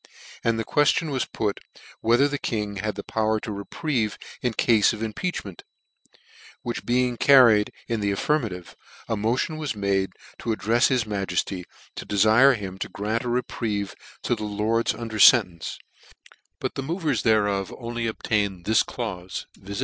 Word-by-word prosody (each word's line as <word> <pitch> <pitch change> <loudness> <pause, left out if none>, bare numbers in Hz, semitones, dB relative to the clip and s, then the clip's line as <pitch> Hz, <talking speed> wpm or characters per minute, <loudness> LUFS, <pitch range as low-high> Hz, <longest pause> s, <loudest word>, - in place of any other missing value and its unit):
And 115 -1 +1
the 110 - -2
queftion 150 +1 +2
was 130 -2 0
put, 105 -3 -2 0.4
whether 120 +5 +4
the 145 0 -3
King 105 -3 -3
had 105 +1 -3
power 110 0 0
to 110 - -5
reprieve, 110 +3 -2 0.2
in 125 -2 0
cafe 110 -1 +3
of 110 - -5
impeachment? 110 - -4 1.0
which 120 - -5
being 125 0 +1
carried 120 -7 +6 0.2
in 115 -1 -1
the 100 -1 0
affirmative, 100 - -1 0.3
a 110 - 0
motion 115 +9 -1
was 150 -7 -3
made 100 -1 0 0.3
to 115 - -5
addrefs 115 +3 +2
his 130 -3 +1
Majcfty 95 -3 -2 0.3
to - - -6
defire 110 +7 +5
him 95 -3 -7
to - - -4
grant 105 +5 -2
a - - -1
reprieve 110 -4 -2 0.3
to - - +1
the 110 -2 -3
lords 105 +2 0
under 110 -2 -5
fcntence; 95 -8 +5 0.8
but - - -3
the - - -4
movers 155 -2 -1
thereof 105 -3 +2
only 120 -1 -3
obtained 100 -5 -1
this 110 +1 +4
chuff, 95 -7 -5
viz. 100 +1 -7
110 Hz, 155 wpm, -25 LUFS, 100-120 Hz, 1.0 s, carried